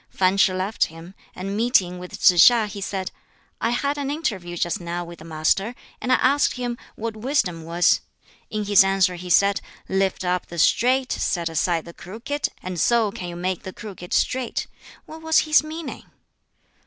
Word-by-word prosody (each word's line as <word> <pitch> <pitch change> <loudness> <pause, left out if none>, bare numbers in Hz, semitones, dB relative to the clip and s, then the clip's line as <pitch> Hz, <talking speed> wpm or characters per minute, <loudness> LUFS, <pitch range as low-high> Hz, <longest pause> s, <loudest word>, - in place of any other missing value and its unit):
Fan 185 0 +2
Ch'i 195 -1 +4
left 185 +4 0
him, 165 +3 -12 0.2
and 195 +2 -4
meeting 205 -6 +2
with 180 0 -9
Tsz 175 +2 +8
hiŠ 235 -3 +1
he 200 -1 -7
said, 190 -1 -3 0.5
"I 230 - +1
had 280 +4 -1
an 280 -1 -2
interview 195 - -3
just 175 +1 -1
now 175 0 -4
with 170 -1 -11
the 155 - -12
Master, 165 +8 0 0.3
and 255 - -1
I - - +7
asked 280 +3 +3
him 245 -2 -3 0.2
what 225 0 -4
wisdom 215 - -1
was. 170 +2 +3 0.5
In 215 -1 -3
his 200 -1 +6
answer 195 -1 +2
he 180 +1 -8
said, 200 +3 +4 0.3
'Lift 190 -1 0
up 180 0 -1
the 170 - -9
straight, 255 +9 +3
set 170 -2 -1
aside 165 +1 0
the 170 - -10
crooked, 230 +12 -4 0.2
and 185 -2 -4
so 230 -3 +3
can 180 -2 -6
you 170 - -7
make 180 +1 -2
the 185 - -8
crooked 190 -4 -10
straight.' 255 -2 0 0.4
What 320 +1 -11
was 320 0 +2
his 305 0 +4
meaning?" 315 0 -7
195 Hz, 185 wpm, -23 LUFS, 175-240 Hz, 0.5 s, Tsz